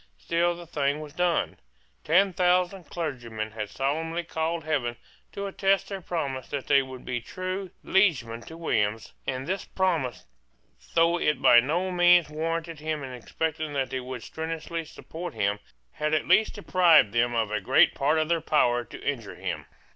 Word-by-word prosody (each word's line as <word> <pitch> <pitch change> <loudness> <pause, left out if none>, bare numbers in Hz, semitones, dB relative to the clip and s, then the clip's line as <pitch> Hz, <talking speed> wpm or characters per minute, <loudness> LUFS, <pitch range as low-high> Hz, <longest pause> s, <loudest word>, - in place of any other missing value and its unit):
Still 170 - +1
the 175 0 -10
thing 145 -3 -1
was 150 -2 -9
done. 175 -1 0 0.5
Ten 185 +4 +4
thousand 180 +1 +2
clergymen 120 -10 -4
had 105 -2 -5
solemnly 160 +5 -2
called 160 0 -2
heaven 135 -6 -1 0.4
to 200 - -5
attest 195 0 +1
their 195 -2 -5
promise 140 -8 -3
that 140 -2 -4
they 140 -1 +5
would 130 -1 -9
be 120 -2 -2
true 185 +7 -4
liegemen 130 - +2
to 160 - -9
William; 110 -10 +1 0.3
and 130 0 -2
this 190 +5 -2
promise, 165 - -1 0.7
though 170 +1 +4
it 150 -5 +1
by 120 - +7
no 170 +9 0
means 175 -2 +5
warranted 165 +1 -3
him 155 -1 -3
in 130 -1 -6
expecting 155 +5 -3
that 135 -2 -1
they 130 - -1
would 125 -1 -7
strenuously 165 +1 -4
support 165 0 -8
him, 105 -1 0 0.3
had 150 +1 0
at 155 - -1
least 220 - +4
deprived 180 - +4
them 120 0 +2
of 110 -2 0
a 105 -1 -1
great 95 - +5
part 150 +3 +1
of 155 0 +1
their 170 0 +1
power 120 -6 +2
to 115 - -11
injure 120 -8 -3
him. - - -5
155 Hz, 170 wpm, -27 LUFS, 130-175 Hz, 0.7 s, by